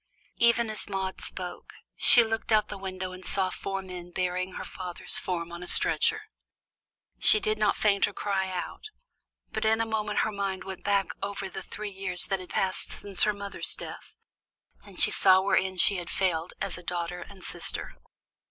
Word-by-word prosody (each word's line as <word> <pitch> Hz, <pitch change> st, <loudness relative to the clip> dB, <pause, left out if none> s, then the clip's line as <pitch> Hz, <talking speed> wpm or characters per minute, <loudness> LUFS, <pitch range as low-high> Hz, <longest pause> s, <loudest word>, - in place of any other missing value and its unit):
Even 235 Hz, -1 st, +4 dB
as 215 Hz, -, -5 dB
Maude 190 Hz, -1 st, -3 dB
spoke, 180 Hz, -1 st, -6 dB, 0.2 s
she 240 Hz, -, +7 dB
looked 225 Hz, 0 st, -3 dB
out 215 Hz, -1 st, +5 dB
of -, -, -34 dB
the 205 Hz, -, -5 dB
window 185 Hz, -1 st, -5 dB
and 185 Hz, 0 st, -10 dB
saw 190 Hz, 0 st, -1 dB
four 195 Hz, +1 st, -4 dB
men 180 Hz, -2 st, -8 dB
bearing 185 Hz, +1 st, -2 dB
her -, -, -5 dB
father's 180 Hz, -2 st, -3 dB
form 170 Hz, -2 st, -3 dB
on 170 Hz, 0 st, -7 dB
a 180 Hz, -, -6 dB
stretcher. 435 Hz, 0 st, +3 dB, 1.0 s
She 430 Hz, -, +7 dB
did 430 Hz, +1 st, -1 dB
not -, -, +2 dB
faint 200 Hz, -2 st, +3 dB
or 205 Hz, -, -7 dB
cry 190 Hz, -1 st, -1 dB
out, 180 Hz, -, -5 dB, 0.7 s
but -, -, -2 dB
in 220 Hz, +1 st, +3 dB
a 225 Hz, -, +1 dB
moment 215 Hz, -2 st, 0 dB
her 220 Hz, -, 0 dB
mind 200 Hz, -2 st, -3 dB
went 190 Hz, -1 st, -7 dB
back 200 Hz, -1 st, +2 dB
over 200 Hz, -1 st, -4 dB
the 190 Hz, -, -6 dB
three 210 Hz, +2 st, -6 dB
years 190 Hz, -2 st, +1 dB
that 195 Hz, -1 st, -1 dB
had 185 Hz, -, -10 dB
passed 190 Hz, -1 st, -1 dB
since 200 Hz, -3 st, 0 dB
her 210 Hz, -, +2 dB
mother's 200 Hz, 0 st, -3 dB
death, -, -, -9 dB, 0.7 s
and -, -, -13 dB
she -, -, +6 dB
saw 185 Hz, -1 st, +6 dB
wherein 190 Hz, -1 st, +1 dB
she 195 Hz, +2 st, +5 dB
had 175 Hz, -1 st, -6 dB
failed 175 Hz, -3 st, -1 dB
as -, -, -3 dB
a -, -, -13 dB
daughter 175 Hz, 0 st, -3 dB
and 195 Hz, -2 st, -12 dB
sister. -, -, -5 dB
190 Hz, 190 wpm, -28 LUFS, 185-205 Hz, 1.0 s, she